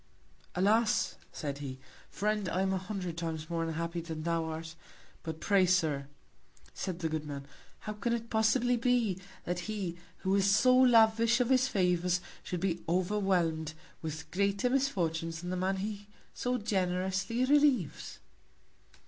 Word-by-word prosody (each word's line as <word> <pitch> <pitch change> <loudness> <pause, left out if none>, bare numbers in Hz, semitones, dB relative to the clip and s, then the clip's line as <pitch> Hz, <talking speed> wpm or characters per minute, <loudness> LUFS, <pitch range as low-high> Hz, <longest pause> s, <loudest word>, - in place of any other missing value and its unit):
Alas! 205 +1 +2 0.2
said 140 -2 -4
he, 135 -2 -6 0.3
Friend, 210 -2 -1
I 185 +3 0
am 190 0 +1
a 190 - 0
hundred 180 -3 -4
Times 160 -1 -4
more 165 -1 0
unhappy 170 +1 -3
than 160 -2 -6
thou 165 -1 0
art. 160 0 -5 0.5
But 160 -1 -6
pray, 190 +2 +3
Sir, 155 -6 +1 0.7
said 185 -3 -4
the 165 - +1
good 155 -1 -2
Man, 140 -2 -6 0.4
how 215 - -4
can 210 +3 -2
it 230 -1 -2
possibly 235 +3 +3
be, 230 -6 +1 0.2
that 175 0 -2
he, 190 -5 -3 0.2
who 190 0 +1
is 200 0 +3
so 255 +5 +5
lavish 230 -2 +5
of 250 -1 +1
his 260 0 +4
Favours, 180 -4 +1 0.2
should 180 -2 -4
be 180 -3 0
overwhelm'd 175 -4 +1 0.3
with 160 0 -6
greater 200 +5 +1
Misfortunes 165 -11 0
than 180 0 -4
the - - -1
Man 185 +1 0
he 205 +1 -5 0.3
so 250 0 -1
generously 190 +2 0
relieves? 280 - +2
185 Hz, 150 wpm, -31 LUFS, 165-220 Hz, 0.7 s, so